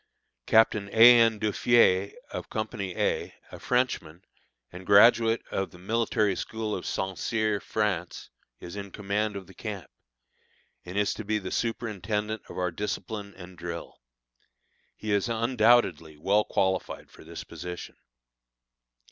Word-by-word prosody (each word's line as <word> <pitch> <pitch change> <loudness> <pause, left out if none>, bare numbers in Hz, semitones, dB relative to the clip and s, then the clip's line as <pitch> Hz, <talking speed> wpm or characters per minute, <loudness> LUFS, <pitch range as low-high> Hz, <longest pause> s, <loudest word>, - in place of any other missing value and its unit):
Captain 110 -2 +3
A. 120 +2 +9
N. 115 -2 +3
Duffié, 105 -2 +3 0.2
of - - -6
Co. 110 0 -2
A, 95 -3 -2 0.2
a - - -9
Frenchman 95 -9 -1 0.5
and 90 +1 -10
graduate 115 +2 +5
of 95 - -2
the - - -15
military 105 0 0
school 110 0 -4
of 90 - -4
St. 95 0 -2
Cyr, 110 -3 0
France, 95 -6 -3 0.3
is 85 - -9
in 100 -1 -6
command 105 +1 -2
of 100 -1 -6
the 95 - -16
camp, 100 - -7 0.9
and 90 +3 -6
is 105 0 +2
to - - -7
be 110 +1 0
the 95 -3 -6
superintendent 110 -1 -2
of - - -9
our 90 -1 -1
discipline 105 +2 -5
and 90 -1 -12
drill. 85 -1 -7 0.9
He 110 - -5
is 100 +3 +1
undoubtedly 115 - +2
well 100 +7 +2
qualified 95 -1 -1
for - - -15
this 85 +1 -8
position. 90 0 -8
105 Hz, 140 wpm, -27 LUFS, 95-110 Hz, 0.9 s, A